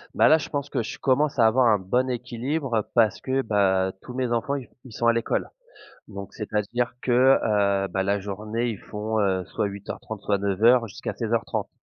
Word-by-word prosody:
Bah - - +5
là, 155 - +7
je - - -6
pense 145 -1 -3
que - - 0
je 110 - -6
commence 140 +2 +1
à 115 - +5
avoir 120 +3 +4
un 110 -2 +5
bon 125 +7 0
équilibre 125 0 -2
parce 115 -3 +3
que, 135 0 0
bah, 95 -4 +2
tous 125 - -10
mes 130 -1 -1
enfants 120 +4 0
i 135 -3 -6 0.2
ils 130 - -13
sont 115 - -3
à 115 - +5
l'école. 115 0 -1 0.6
Donc 100 -1 -8
c'est 105 - -7
à 105 - +3
dire 120 0 0
que, 125 - -1 0.3
heu, 100 -2 +1
bah, 95 0 -1
la 100 +1 0
journée 105 +4 -3
ils 110 - -4
font, 110 +3 -3
heu, 95 -2 0
soit 105 - -2
08:30, 100 +2 -7
soit 100 -1 +1
09:00 110 +5 +3
jusqu'à 95 - -6
16:30. 115 -2 -2
110 Hz, 210 wpm, -25 LUFS, 100-125 Hz, 0.6 s, là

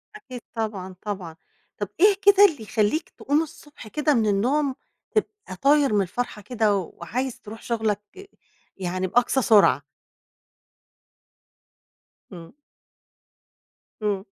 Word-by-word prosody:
أكيد 255 - -9
طبعًا، 200 -5 -4
طبعًا. 190 -6 -5 0.4
طَب 205 - -4
إيه 405 +2 +6
كده 405 +1 +7
اللي 310 - 0
يخلّيك 215 - 0
تقوم 290 +2 0
الصبح 295 -6 -13
كده 300 +5 +1
من 225 -4 +2
النوم 260 +8 +1 0.4
تبقي 420 - -3
طاير 280 -4 +4
من 205 - +3
الفرحة 210 +3 -4
كده 215 -1 +1
وعايز 220 +7 -4
ترُوح 220 +1 -10
شغلك 220 - -3 0.5
يعني 185 0 -2
بأقصى 245 +6 +2
سرعة؟ 210 -2 +5 2.5
إمم. 165 -2 -11 1.5
إمم. 200 -2 -1
225 Hz, 110 wpm, -24 LUFS, 200-290 Hz, 2.5 s, كده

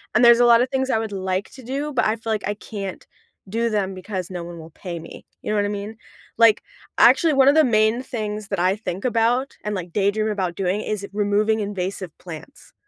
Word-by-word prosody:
And 235 - +6
there's 235 0 +8
a 245 - +6
lot 235 0 +6
of 250 - 0
things 265 0 -1
I - - +2
would 220 -1 -4
like 190 0 -2
to 260 - -13
do, 280 +5 -3
but 250 - +2
I 215 - +2
feel 225 0 -2
like 210 -3 -2
I 205 - 0
can't 200 -3 -7 0.4
do 230 +3 0
them 200 -3 -1
because 185 -1 -5
no 180 -2 -5
one 170 0 -8
will 160 +1 -11
pay 170 +1 -7
me. 165 - -11 0.2
You - - -3
know 215 - +1
what 205 - +2
I - - -1
mean? 205 +2 -5 0.4
Like, 230 -2 +5 0.3
actually, 325 -3 +6
one 270 -1 +5
of 290 - +4
the 315 - +6
main 220 +1 +3
things 215 -5 -4
that 195 -3 -2
I 185 +2 +2
think 200 0 -5
about 240 +3 +1
and, 210 0 -2
like, 180 -2 -6
daydream 210 +2 +1
about 185 -5 -2
doing 195 +2 -1
is 205 -2 -3
removing 210 +2 +1
invasive 190 -3 -4
plants. 175 - -11
210 Hz, 235 wpm, -22 LUFS, 190-230 Hz, 0.4 s, there's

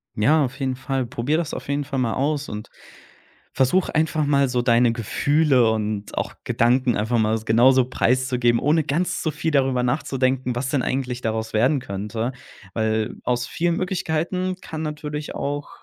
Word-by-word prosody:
Ja, 145 +8 +3
auf 130 +3 -7
jeden 130 -1 -1
Fall. 130 0 -2
Probiere 130 +5 -1
das 170 - -3
auf - - -6
jeden 140 +1 -1
Fall 135 -1 -3
mal 115 -3 0
aus 145 +1 -1
und 105 +1 -7 0.8
versuche 155 +9 +2
einfach 155 0 +1
mal 140 -1 +3
so 125 -1 +1
deine 120 -1 +4
Gefühle 130 +2 +2
und 105 -1 -3
auch - - -2
Gedanken 125 0 +2
einfach 115 +3 0
mal 110 0 +2
s 110 0 -5
genauso 125 +3 +5
preiszugeben, 125 -1 +1
ohne 155 +1 +2
ganz 165 +7 -1
so 160 - -1
viel 160 +2 -2
darüber 130 -3 +2
nachzudenken, 130 -1 0
was 130 +2 -2
denn 140 -3 +1
eigentlich 125 -2 -2
daraus 110 0 -2
werden 130 +7 +3
könnte, 110 +2 -4 0.4
weil 110 -1 -1
aus 125 0 -1
vielen 170 0 0
Möglichkeiten 180 0 -1
kann 160 0 -6
natürlich 150 0 -5
auch, 145 +1 -3
130 Hz, 170 wpm, -23 LUFS, 120-150 Hz, 0.8 s, genauso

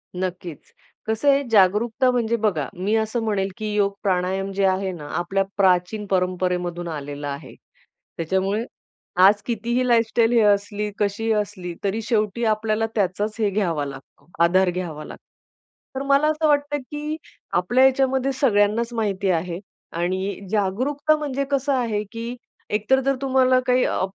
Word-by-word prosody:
नक्कीच, 180 -3 -5 0.4
कसं 220 +6 +1
आहे 280 0 +4
जागरूकता 220 +6 +3
म्हणजे 235 -2 +1
बघा, 200 - 0
मी 195 +5 -1
असं 220 +1 0
म्हणेल, 195 -3 0
की 215 -1 -3
योग 200 -1 +2
प्राणायाम 190 +1 0
जे 195 0 +1
आहे 190 0 +1
ना 155 -5 -8
आपल्या 195 +3 0
प्राचीन 190 +2 +2
परंपरेमधून 180 -1 -1
आलेलं 145 -2 -5
आहे. 140 +2 -7 0.6
त्याच्यामुळे 190 +6 0 0.6
आज 205 +1 +5
कितीही 240 +2 -1
लाईफस्टाईल 230 0 +3
हे 235 - +5
असली 205 0 +1
कशीही 210 +2 0
असली, 200 -4 -3
तरी 200 +3 -1
शेवटी 220 0 0
आपल्याला 215 0 +1
त्याचाच 205 +2 0
हे 210 -2 +2
घ्यावा 170 -8 -1
लागतो, 140 +1 -11 0.2
आधार 185 +2 +4
घ्यावा 170 -4 -4
लागतो. - - -12 0.7
तर - - -3
मला 280 +2 +4
असं 310 0 +1
वाटतं, 290 0 +2
की 295 +3 -5 0.4
आपल्या 245 +9 +4
याच्यामध्ये 265 0 +2
सगळ्यांनाच 230 -2 +2
माहिती 200 -4 -1
आहे 170 +1 -2 0.4
आणि 185 +3 -2
जागरूकता 255 +10 +1
म्हणजे 280 -2 -2
कसं 275 0 +1
आहे 230 -5 0
की 230 +1 -5 0.3
एकतर 215 +6 +2
जर 275 +1 +1
तुम्हाला 260 -1 +3
काही 250 0 +3
आह, 185 - 0
210 Hz, 145 wpm, -23 LUFS, 185-240 Hz, 0.7 s, आज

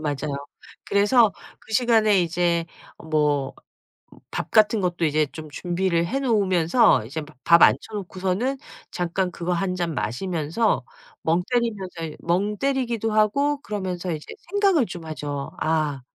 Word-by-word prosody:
맞아요. 145 -1 -3 0.4
그래서 210 +2 +4 0.3
그 - - -13
시간에 220 -4 +4
이제 170 0 0 0.4
뭐 145 -3 +1 0.8
밥 - - -4
같은 215 0 +4
것도 175 -2 -1
이제 155 0 +2
좀 155 -1 -9
준비를 175 +1 0
해 270 +7 -1
놓으면서 195 - +3
이제 140 +8 -5
바 150 -1 -13
밥 170 0 +6
앉혀 - - +7 0.2
놓고서는 195 +6 -2 0.3
잠깐 180 +1 -1
그거 175 0 -3
1 180 +1 -1
잔 175 -2 -2
마시면서 165 - -1 0.4
멍 170 +2 +2
때리면서 190 -9 -2
멍 195 +5 0
때리기도 240 -4 -1
하고 280 +7 +2
그러면서 185 -6 -4
이제 155 -2 -4 0.3
생각을 390 - +3
좀 175 -3 -8
하죠. 145 -3 -5
'아 155 -3 0
180 Hz, 270 characters per minute, -24 LUFS, 160-215 Hz, 0.8 s, 앉혀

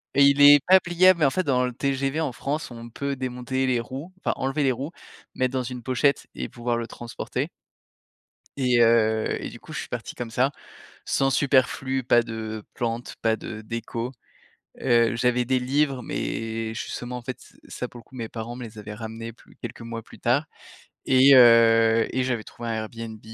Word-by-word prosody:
Il 140 +1 +5
est 145 0 +10
pas 190 +1 +7
pliable, 180 +1 +4
mais - - +6
en - - +5
fait, 185 +7 -1
dans 130 -5 +2
le 125 - -2
TGV 135 +2 -1
en 155 -6 -1
France, 145 +5 -3
on 120 -1 -9
peut 140 +3 -3
démonter 130 0 -2
les 125 -2 +1
roues, 135 +8 -7
enfin, - - -1
enlever 135 +3 -1
les 135 -2 +3
roues, 135 +6 -5 0.4
mettre 130 0 0
dans 130 -1 0
une 125 0 -6
pochette 130 +4 +1
et - - -4
pouvoir 120 0 -2
le 115 0 -2
transporter 120 0 -5 1.1
et 125 -3 +2
heu, 110 -1 +3
et - - -5
du - - -11
coup, - - -13
je - - -4
suis - - -6
parti - - -6
comme 120 -2 -6
ça, 130 +4 +2 0.5
sans 135 0 +1
superflu, 130 -1 +1
pas 120 -1 +4
de 110 -1 -6
plantes, 120 0 -3
pas 115 -1 +2
de 110 -1 -7
déco. 115 +2 -5 0.7
Heu, 120 -2 +3
j'avais 125 +1 +2
des 130 +1 +1
livres 135 +1 0
mais 115 -1 -3
justement, 125 +2 -5
en 125 - -7
fait, 130 +1 -6
ce - - -18
ça, - - -5
pour 120 - -12
le 115 - -14
coup, - - -21
mes 115 -3 -5
parents 115 +1 -6
me 125 - -8
les 110 -1 -10
avaient 105 0 -7
ramenés 115 +1 -7
plus 115 - -21
quelques - - -8
mois 115 0 -6
plus - - -16
tard 130 +6 +2 0.6
et 130 +1 +6
heu, 115 -2 +6
et 130 - +2
j'avais 120 -4 -1
trouvé 120 +2 -8
un - - -1
Airbnb, 110 0 -6
125 Hz, 200 wpm, -25 LUFS, 115-135 Hz, 1.1 s, est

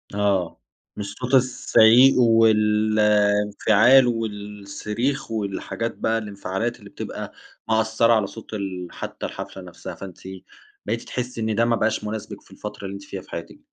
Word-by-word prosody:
آه. 100 -4 0 0.4
مش 100 -1 -6
صوت 125 +1 -3
الزعيق، 125 0 +5
والانفعال، 105 +1 +4
والصريخ، 105 +3 -3
والحاجات 110 +2 -3
بقى 110 0 0
الانفعالات 105 +2 -4
اللي - - -13
بتبقى - - -7 0.4
مأثّرة 110 +1 +3
على 110 -3 +2
صوت 110 +2 -11
ال 95 -4 -4
حتّى - - -6
الحفلة - - -7
نفسها، - - -9
فأنتِ 95 -3 -10 0.7
بقيتِ 115 +2 -2
تحسّي 125 -2 -5
إن 110 -1 -1
ده 115 - +3
ما 115 0 +2
بقاش 110 -1 0
مُناسبِك 105 -1 -6
في - - -23
الفترة 105 -1 -8
اللي 95 - -5
أنتِ 100 0 -8
فيها 95 -1 -7
في - - -20
حياتِك. 85 - -7
110 Hz, 145 wpm, -23 LUFS, 100-115 Hz, 0.7 s, الزعيق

